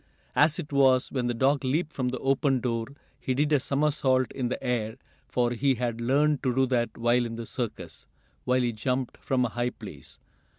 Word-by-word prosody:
As 150 Hz, +1 st, +4 dB
it 150 Hz, -5 st, -6 dB
was, 130 Hz, -2 st, +4 dB
when 125 Hz, -3 st, -1 dB
the 120 Hz, -, 0 dB
dog 135 Hz, +4 st, +2 dB
leaped 155 Hz, +5 st, -1 dB
from 130 Hz, -2 st, -1 dB
the 130 Hz, -, -3 dB
open 135 Hz, +1 st, +1 dB
door, 115 Hz, -2 st, -1 dB, 0.3 s
he 130 Hz, 0 st, -2 dB
did 150 Hz, +3 st, +1 dB
a 145 Hz, -, +5 dB
somersault 140 Hz, -2 st, +1 dB
in 125 Hz, -3 st, -2 dB
the 130 Hz, -, -4 dB
air, 115 Hz, -3 st, -1 dB, 0.3 s
for 120 Hz, -1 st, 0 dB
he 130 Hz, +3 st, +1 dB
had 120 Hz, -1 st, -3 dB
learned 145 Hz, +4 st, +2 dB
to 125 Hz, -3 st, 0 dB
do 135 Hz, 0 st, +4 dB
that 120 Hz, -3 st, -1 dB
while 120 Hz, +1 st, +2 dB
in 115 Hz, -1 st, -4 dB
the 115 Hz, 0 st, -6 dB
circus, 120 Hz, -1 st, -6 dB, 0.4 s
when 125 Hz, 0 st, +2 dB
he 120 Hz, -, +1 dB
jumped 125 Hz, +4 st, -2 dB
from 130 Hz, -2 st, 0 dB
a -, -, -1 dB
high 120 Hz, +2 st, -1 dB
place. -, -, -11 dB
130 Hz, 205 wpm, -27 LUFS, 120-135 Hz, 0.4 s, a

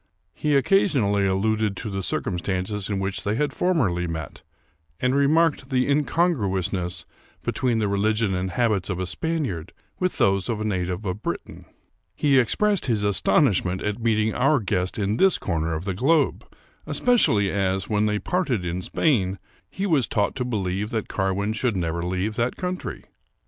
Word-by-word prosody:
He 150 Hz, -1 st, 0 dB
occasionally 130 Hz, -, +3 dB
alluded 105 Hz, +1 st, 0 dB
to 110 Hz, -, -5 dB
the 95 Hz, 0 st, -2 dB
circumstances 95 Hz, +2 st, -2 dB
in 100 Hz, -, -1 dB
which 95 Hz, 0 st, -3 dB
they 105 Hz, +1 st, 0 dB
had 145 Hz, +2 st, 0 dB
formerly 110 Hz, -, +1 dB
met, 80 Hz, -3 st, -6 dB, 0.6 s
and 125 Hz, +1 st, +1 dB
remarked 140 Hz, 0 st, +2 dB
the 130 Hz, -2 st, +2 dB
incon 155 Hz, +5 st, +2 dB
gruousness 95 Hz, -, -2 dB, 0.4 s
between 125 Hz, -3 st, 0 dB
the 110 Hz, -2 st, +1 dB
religion 105 Hz, +1 st, +1 dB
and 90 Hz, +1 st, -1 dB
habits 105 Hz, -1 st, 0 dB
of 95 Hz, -, -2 dB
a 95 Hz, -, -1 dB
Spaniard 130 Hz, -, -3 dB, 0.3 s
with 185 Hz, 0 st, -1 dB
those 100 Hz, +2 st, +2 dB
of 115 Hz, -2 st, -1 dB
a -, -, -2 dB
native 90 Hz, -1 st, -2 dB
of 95 Hz, +2 st, -3 dB
Britain. -, -, -5 dB, 0.5 s
He 140 Hz, -3 st, +4 dB
expressed 200 Hz, -, +1 dB
his 110 Hz, -4 st, +1 dB
aston 100 Hz, -, +3 dB
ishment 95 Hz, -5 st, 0 dB
at 105 Hz, +2 st, -3 dB
meeting 110 Hz, -1 st, +1 dB
our 140 Hz, +3 st, +3 dB
guest 90 Hz, -3 st, -1 dB
in 105 Hz, +1 st, 0 dB
this 190 Hz, -1 st, +4 dB
corner 80 Hz, -3 st, -1 dB
of 80 Hz, +4 st, -5 dB
the 95 Hz, -, -1 dB
globe, 140 Hz, -, +1 dB, 0.4 s
especially 110 Hz, -, +3 dB
as, 95 Hz, -2 st, 0 dB
when 105 Hz, 0 st, +1 dB
they 105 Hz, 0 st, +1 dB
parted 130 Hz, -, -1 dB
in 90 Hz, +1 st, -2 dB
Spain, 100 Hz, -, +1 dB, 0.3 s
he 195 Hz, -, -3 dB
was 155 Hz, -, +2 dB
taught 105 Hz, -1 st, 0 dB
to 125 Hz, -, 0 dB
believe 105 Hz, -4 st, -2 dB
that 110 Hz, -2 st, -3 dB
Carwin 95 Hz, +2 st, -1 dB
should 115 Hz, -2 st, 0 dB
never 85 Hz, -1 st, -2 dB
leave 95 Hz, +4 st, -2 dB
that 120 Hz, +1 st, 0 dB
country. 180 Hz, 0 st, -4 dB
105 Hz, 170 wpm, -24 LUFS, 95-130 Hz, 0.6 s, He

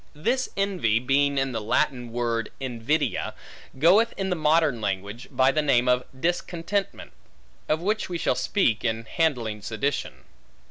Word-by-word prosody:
This 245 Hz, -, 0 dB
envy, 185 Hz, -, +1 dB
being 140 Hz, +3 st, +2 dB
in 135 Hz, 0 st, +1 dB
the 115 Hz, -2 st, -3 dB
Latin 125 Hz, +1 st, 0 dB
word 115 Hz, -1 st, -1 dB
invidia, 130 Hz, +4 st, -1 dB, 0.4 s
goeth 195 Hz, -, +4 dB
in 190 Hz, -1 st, -2 dB
the -, -, +2 dB
modern 155 Hz, -6 st, +2 dB
language, 100 Hz, +4 st, -3 dB
by 130 Hz, +1 st, +3 dB
the 155 Hz, -, +1 dB
name 125 Hz, -5 st, +2 dB
of 125 Hz, 0 st, +2 dB
discontentment; 175 Hz, +4 st, -2 dB, 0.6 s
of 155 Hz, +1 st, +1 dB
which 215 Hz, +1 st, -1 dB
we 175 Hz, -, -2 dB
shall -, -, +1 dB
speak, 125 Hz, -, +1 dB
in 115 Hz, 0 st, -1 dB
handling 120 Hz, -8 st, -1 dB
sedition. 115 Hz, +8 st, -3 dB
135 Hz, 145 wpm, -25 LUFS, 115-170 Hz, 0.6 s, goeth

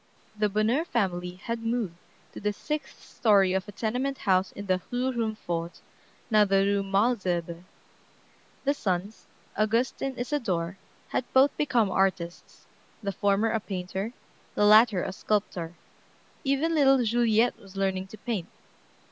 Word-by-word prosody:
The 210 Hz, 0 st, +1 dB
Bonheur 215 Hz, +9 st, +1 dB
family 180 Hz, -, -1 dB
had 230 Hz, +5 st, -4 dB
moved 225 Hz, -5 st, -1 dB, 0.4 s
to -, -, -7 dB
the 210 Hz, 0 st, -1 dB
sixth 300 Hz, +8 st, -5 dB
story 200 Hz, -4 st, +3 dB
of 190 Hz, +2 st, -1 dB
a -, -, -7 dB
tenement 250 Hz, +6 st, -2 dB
house 190 Hz, -1 st, +2 dB
in 200 Hz, -, -7 dB
the 185 Hz, -1 st, +1 dB
Rue 250 Hz, +2 st, 0 dB
Rumfort, 195 Hz, -8 st, -3 dB, 0.5 s
now 215 Hz, -1 st, +6 dB
the 195 Hz, -1 st, +3 dB
Rue 200 Hz, 0 st, +2 dB
Malesherbes. 195 Hz, -5 st, 0 dB, 1.0 s
The 280 Hz, +1 st, +2 dB
sons, 195 Hz, -4 st, -3 dB, 0.3 s
Auguste 225 Hz, +4 st, +1 dB
and 270 Hz, -2 st, -3 dB
Isadore, 195 Hz, -, -2 dB, 0.3 s
had 250 Hz, -, -2 dB
both 270 Hz, +2 st, +5 dB
become 235 Hz, -9 st, +1 dB
artists; 185 Hz, -3 st, -1 dB, 0.4 s
the 200 Hz, -, -1 dB
former 205 Hz, +3 st, +1 dB
a 225 Hz, -, +1 dB
painter, 190 Hz, +1 st, -4 dB, 0.4 s
the 205 Hz, -, +3 dB
latter 215 Hz, -2 st, +6 dB
a 190 Hz, -, -4 dB
sculptor. 185 Hz, -5 st, -2 dB, 0.7 s
Even 285 Hz, +4 st, +1 dB
little 270 Hz, -4 st, +5 dB
Juliette 230 Hz, 0 st, +2 dB
was 195 Hz, -1 st, -14 dB
learning 190 Hz, -1 st, -1 dB
to 215 Hz, -, -11 dB
paint. 215 Hz, -6 st, -3 dB
210 Hz, 140 wpm, -27 LUFS, 190-240 Hz, 1.0 s, now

